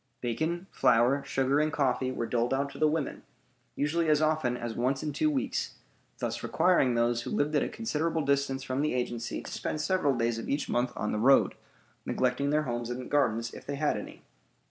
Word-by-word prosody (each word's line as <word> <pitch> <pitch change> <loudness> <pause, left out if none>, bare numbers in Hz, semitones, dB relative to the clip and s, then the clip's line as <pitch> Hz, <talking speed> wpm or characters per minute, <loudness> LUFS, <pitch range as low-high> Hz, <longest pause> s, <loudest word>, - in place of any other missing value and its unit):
Bacon, 160 +9 -2
flour, 125 +5 +3
sugar, 135 +2 +1
and 155 0 +1
coffee 130 -2 0
were 120 - -2
doled 120 +2 0
out 140 +1 -1
to - - -11
the 155 - +4
women, 150 -1 -2 0.5
usually 160 +3 0
as 150 -1 +4
often 155 -6 +1
as 120 -1 -4
once 130 +4 0
in 150 -1 -2
two 310 - +2
weeks, 280 -3 -2 0.4
thus - - -3
requiring 140 -9 +3
those 120 0 +2
who - - -6
lived 150 -8 0
at 145 - +3
a - - -1
considerable 165 -7 -1
distance 140 -1 0
from 130 +1 -2
the 150 -3 0
agency 120 -1 -3
to - - -8
spend 155 - -3
several 155 -5 +1
days 115 -1 0
of - - -6
each 140 - -1
month 120 +1 0
on 105 - -2
the 105 - -1
road, 135 +5 +5 0.5
neglecting 130 +2 0
their 150 +1 +2
homes 120 -3 -3
and 125 +1 -5
gardens, 115 -5 +1
if - - -9
they 140 - -2
had 150 +1 +1
any. - - -8
135 Hz, 205 wpm, -29 LUFS, 120-150 Hz, 0.5 s, road